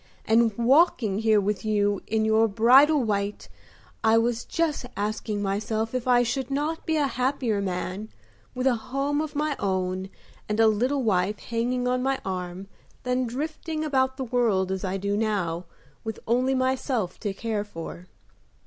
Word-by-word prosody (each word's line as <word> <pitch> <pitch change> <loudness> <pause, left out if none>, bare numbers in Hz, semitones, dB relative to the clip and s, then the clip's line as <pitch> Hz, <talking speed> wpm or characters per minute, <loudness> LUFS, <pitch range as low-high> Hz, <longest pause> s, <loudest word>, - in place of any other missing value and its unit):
And 225 -1 +3
walking 240 - +3
here 220 -1 +4
with 205 0 -1
you 205 -2 +1
in 220 0 +1
your 220 +1 +4
bridal 260 +7 +5
white 205 -2 -2 0.6
I 220 0 +5
was 235 0 0
just 330 -4 -1
asking 210 0 -2
myself 215 +3 -1
if 255 -1 -2
I 245 -1 +5
should 255 +2 -2
not 295 +4 -2
be 320 -1 +1
a 295 - +2
happier 250 -4 0
man 185 +2 -3 0.5
with 255 +1 -2
a 265 - +5 0.2
home 280 +3 0
of 310 -1 -5
my 300 0 0
own 185 -1 -1 0.4
and 210 +1 -1
a 225 - +6
little 250 +6 +2
wife 200 -1 +1
hanging 245 +2 -2
on 250 0 +1
my 270 +1 0
arm 185 0 -4 0.4
than 250 0 0
drifting 310 +5 -4
about 260 -3 +1
the 265 - -2
world 225 -7 +1
as 190 -1 -3
I 190 0 -1
do 200 +1 -1
now 190 -6 -1 0.4
with 220 -1 -5
only 255 +3 +2
myself 255 -6 -1
to 205 - -2
care 210 +1 -2
for." 175 -2 -8
225 Hz, 165 wpm, -26 LUFS, 205-260 Hz, 0.6 s, a